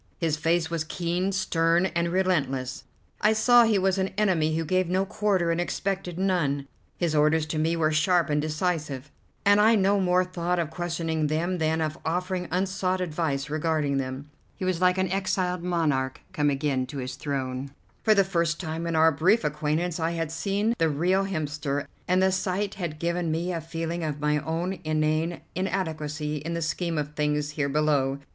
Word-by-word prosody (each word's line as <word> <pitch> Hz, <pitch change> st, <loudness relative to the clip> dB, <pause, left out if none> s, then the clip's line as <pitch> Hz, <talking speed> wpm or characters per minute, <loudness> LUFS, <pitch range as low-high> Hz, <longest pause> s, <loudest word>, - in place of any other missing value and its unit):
His 165 Hz, -3 st, 0 dB
face 165 Hz, +1 st, 0 dB
was 165 Hz, -2 st, -1 dB
keen, 175 Hz, +4 st, -1 dB
stern, 170 Hz, -2 st, +2 dB
and 170 Hz, -1 st, 0 dB
relentless; 140 Hz, -8 st, 0 dB, 0.4 s
I 215 Hz, +1 st, +4 dB
saw 240 Hz, +2 st, +6 dB
he 220 Hz, -2 st, +3 dB
was 190 Hz, 0 st, +1 dB
an 190 Hz, -, +1 dB
enemy 170 Hz, -7 st, +2 dB
who 165 Hz, -, -1 dB
gave 185 Hz, +2 st, +1 dB
no 190 Hz, +2 st, +1 dB
quarter 195 Hz, -4 st, +1 dB
and 165 Hz, +1 st, 0 dB
expected 185 Hz, -1 st, -3 dB
none. 160 Hz, -8 st, 0 dB, 0.3 s
His 170 Hz, -3 st, 0 dB
orders 150 Hz, +1 st, +3 dB
to 155 Hz, 0 st, -3 dB
me 165 Hz, +2 st, +1 dB
were 160 Hz, -2 st, +2 dB
sharp 165 Hz, +3 st, +3 dB
and 150 Hz, 0 st, +2 dB
decisive, 155 Hz, -3 st, -2 dB, 0.3 s
and 205 Hz, +1 st, +6 dB
I 225 Hz, +2 st, +6 dB
no 200 Hz, 0 st, +3 dB
more 180 Hz, -1 st, +3 dB
thought 180 Hz, -1 st, -2 dB
of 165 Hz, -3 st, -1 dB
questioning 165 Hz, -2 st, -1 dB
them 170 Hz, +4 st, -1 dB
than 160 Hz, 0 st, +1 dB
of 155 Hz, +1 st, -2 dB
offering 180 Hz, +2 st, -2 dB
unsought 185 Hz, +1 st, 0 dB
advice 155 Hz, -5 st, -1 dB
regarding 155 Hz, -2 st, 0 dB
them. 135 Hz, +2 st, -4 dB, 0.2 s
He 190 Hz, -, -4 dB
was 185 Hz, -2 st, 0 dB
like 180 Hz, 0 st, +4 dB
an 190 Hz, -1 st, 0 dB
exiled 185 Hz, -2 st, 0 dB
monarch 155 Hz, -7 st, 0 dB
come 145 Hz, -1 st, +2 dB
again 135 Hz, -2 st, 0 dB
to 140 Hz, -, -7 dB
his 130 Hz, -1 st, -4 dB
throne; 135 Hz, -1 st, -3 dB, 0.3 s
for 215 Hz, -1 st, +4 dB
the 200 Hz, -, +5 dB
first 170 Hz, -4 st, 0 dB
time 165 Hz, 0 st, -4 dB
in 165 Hz, -, -1 dB
our 160 Hz, +1 st, +5 dB
brief 180 Hz, +9 st, +3 dB
acquaintance 155 Hz, +3 st, -1 dB
I 165 Hz, +1 st, 0 dB
had 165 Hz, -2 st, -2 dB
seen 200 Hz, +7 st, 0 dB
the 165 Hz, -1 st, +3 dB
real 180 Hz, +6 st, +1 dB
Hemster, 150 Hz, -5 st, -2 dB, 0.2 s
and 185 Hz, +1 st, +3 dB
the 190 Hz, -, +4 dB
sight 190 Hz, +1 st, -1 dB
had 170 Hz, -5 st, -4 dB
given 170 Hz, +1 st, -1 dB
me 170 Hz, +3 st, -1 dB
a 165 Hz, -, -3 dB
feeling 165 Hz, +1 st, -4 dB
of 150 Hz, -2 st, -3 dB
my 150 Hz, 0 st, +1 dB
own 165 Hz, +5 st, -3 dB
inane 155 Hz, +2 st, 0 dB
inadequacy 155 Hz, -5 st, -2 dB
in 165 Hz, +4 st, -4 dB
the 170 Hz, -, -2 dB
scheme 165 Hz, +1 st, -2 dB
of 150 Hz, 0 st, -3 dB
things 150 Hz, -1 st, 0 dB
here 145 Hz, -1 st, -1 dB
below. 140 Hz, -2 st, +1 dB
165 Hz, 185 wpm, -26 LUFS, 150-185 Hz, 0.4 s, saw